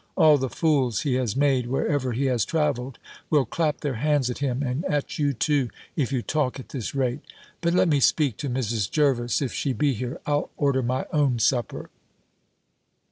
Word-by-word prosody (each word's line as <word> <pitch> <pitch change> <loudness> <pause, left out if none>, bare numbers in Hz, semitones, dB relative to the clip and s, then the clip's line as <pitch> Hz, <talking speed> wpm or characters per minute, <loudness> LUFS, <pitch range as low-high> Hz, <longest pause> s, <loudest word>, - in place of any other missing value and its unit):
All 155 -5 +6
the 130 0 -1
fools 135 -8 +1
he 145 -4 0
has 125 -5 0
made 135 -3 +2
wherever 135 0 0
he 135 +4 -1
has 125 -4 +2
travelled, 135 -6 -1 0.3
will 150 -4 +3
clap 150 +5 -1
their 140 -5 -2
hands 145 -4 +2
at - - -6
him, 135 -1 -1
and 130 +4 -2
at 150 -6 -2
you 145 -1 +2
too, 140 -1 0 0.3
if 140 -6 0
you 130 -3 -1
talk 145 -3 -1
at 130 - -10
this 130 -1 -5
rate. 130 -2 0 0.4
But 170 0 +1
let 180 - +4
me 150 -3 +3
speak 140 -3 +2
to 140 - -4
Mrs. 115 -6 -1
Jervis, 135 -4 +1
if 130 - -3
she 135 - -1
be 145 +1 +1
here: 125 +2 -5
I'll 145 0 0
order 140 -2 +2
my 130 +2 -1
own 140 -5 +2
supper." 120 +2 -1
135 Hz, 190 wpm, -25 LUFS, 125-150 Hz, 0.4 s, All